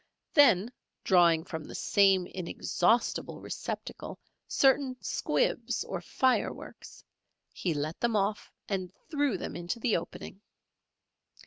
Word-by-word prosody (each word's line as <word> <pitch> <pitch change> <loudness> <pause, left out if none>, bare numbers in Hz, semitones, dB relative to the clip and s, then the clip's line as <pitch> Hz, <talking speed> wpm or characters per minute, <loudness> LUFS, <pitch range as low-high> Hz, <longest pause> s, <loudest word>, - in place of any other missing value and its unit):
Then 240 - +5 0.3
drawing 170 -4 +4
from 160 -3 -6
the - - -9
same 195 -3 +3
inexhaustible 185 +5 0
receptacle - - -6 0.3
certain 265 -1 +3
squibs - - -1
or - - -5
fireworks, 260 -2 -2 0.5
he 170 -4 -2
let 150 +3 -3
them 235 -2 +1
off 205 +1 -1 0.2
and 185 -3 -3 0.2
threw 290 - +1
them - - -6
into 175 +6 -4
the 230 -1 +1
opening. 195 - -6
195 Hz, 110 wpm, -29 LUFS, 175-245 Hz, 0.5 s, Then